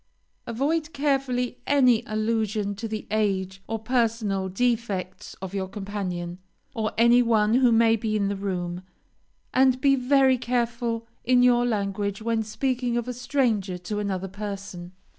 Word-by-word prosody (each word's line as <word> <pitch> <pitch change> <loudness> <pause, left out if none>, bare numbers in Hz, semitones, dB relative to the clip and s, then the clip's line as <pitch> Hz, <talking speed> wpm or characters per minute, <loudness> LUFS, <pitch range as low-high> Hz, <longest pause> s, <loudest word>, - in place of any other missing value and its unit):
Avoid 300 +7 -1
carefully 270 -3 0
any 255 -5 +4
allusion 215 -1 -1
to 215 +3 -5
the 215 -1 -5
age 195 -3 -1
or 225 - -2
personal 220 -4 0
defects 210 -3 -2
of 190 0 -6
your 190 -1 -2
companion, 185 -3 -5 0.3
or 220 -1 -1
any 235 +2 +6
one 220 -2 +2
who 250 -1 +5
may 225 0 +5
be 215 -1 -2
in 200 -2 +1
the 200 - -1
room, 180 -3 -3 0.7
and 260 -1 +4
be 275 +1 +4
very 265 0 +3
careful 235 -1 -1 0.2
in 250 0 +4
your 245 -1 +4
language 200 -2 -2
when 225 0 0
speaking 240 +2 -1
of 240 0 -2
a 250 - -3
stranger 230 -7 0
to 195 +4 -4
another 195 -2 -2
person. 195 -3 -7
225 Hz, 145 wpm, -25 LUFS, 200-245 Hz, 0.7 s, any